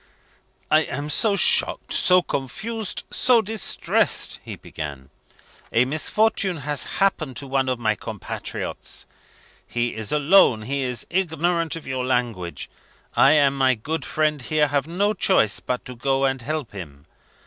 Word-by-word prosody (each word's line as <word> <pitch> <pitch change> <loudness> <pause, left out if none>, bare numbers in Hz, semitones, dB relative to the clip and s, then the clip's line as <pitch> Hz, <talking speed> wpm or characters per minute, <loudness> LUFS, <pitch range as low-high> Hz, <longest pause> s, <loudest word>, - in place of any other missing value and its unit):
"I 155 - +7
am 145 +1 -4
so 205 +8 +3
shocked, - - +3
so 180 -1 +5
confused, 215 - -4
so 250 -2 +4
distressed," 220 0 0
he - - -7
began. 70 -4 -8 0.6
"A 120 +2 +3
misfortune 185 +6 0
has 145 -1 -1
happened 170 -9 0
to 140 - -4
one 135 -1 0
of 130 - 0
my 110 -2 +1
compatriots. 105 - -6 0.6
He 120 0 -1
is 110 -2 -5
alone, 150 - +4
he 140 +4 -2
is 125 -3 -3
ignorant 170 -2 0
of 165 - -8
your 130 -1 -3
language 120 -9 -2 0.5
I 135 +3 +6
and 140 -2 +4
my 130 -2 +3
good 155 +9 -4
friend, 155 -2 0
here, 150 +3 +1
have 140 0 0
no 200 +5 +1
choice 110 - +2
but 125 -1 -4
to 125 - -8
go 135 +3 +1
and 135 -1 0
help 150 -1 -4
him. 75 -8 -10
140 Hz, 150 wpm, -23 LUFS, 125-165 Hz, 0.6 s, I